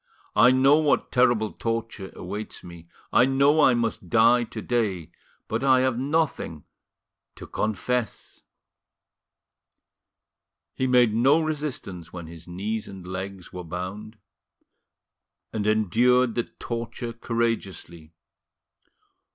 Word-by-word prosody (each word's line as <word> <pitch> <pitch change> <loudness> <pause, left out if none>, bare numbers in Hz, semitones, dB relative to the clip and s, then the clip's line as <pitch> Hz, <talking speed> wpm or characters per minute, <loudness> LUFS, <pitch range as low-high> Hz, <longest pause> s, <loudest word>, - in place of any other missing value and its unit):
I 115 +4 +7
know 135 +3 +5
what 150 -2 +1
terrible 120 -4 +3
torture 115 -4 -4
awaits 105 +1 -7
me, 85 -1 -12 0.3
I 125 - +6
know 140 +3 +3
I 130 -4 +5
must 115 -6 -2
die 120 +3 +5
to 110 - -8
day, 100 -9 -1 0.4
but 115 +4 -2
I 130 -1 +5
have 130 -2 0
nothing 140 - -1 0.7
to - - -10
confess." 110 +2 -3 2.3
He 130 - -1
made 125 -3 +4
no 135 +8 +4
resistance 140 - -4
when 85 -2 -8
his 85 +1 -12
knees 105 +5 -4
and 95 -2 -10
legs 95 0 -7
were 90 -1 -6
bound, 95 +6 -6 1.4
and 105 -1 -2
endured 115 +4 +3
the 120 0 -1
torture 115 0 -6
courageously. 105 -9 -3
115 Hz, 110 wpm, -25 LUFS, 95-125 Hz, 2.3 s, I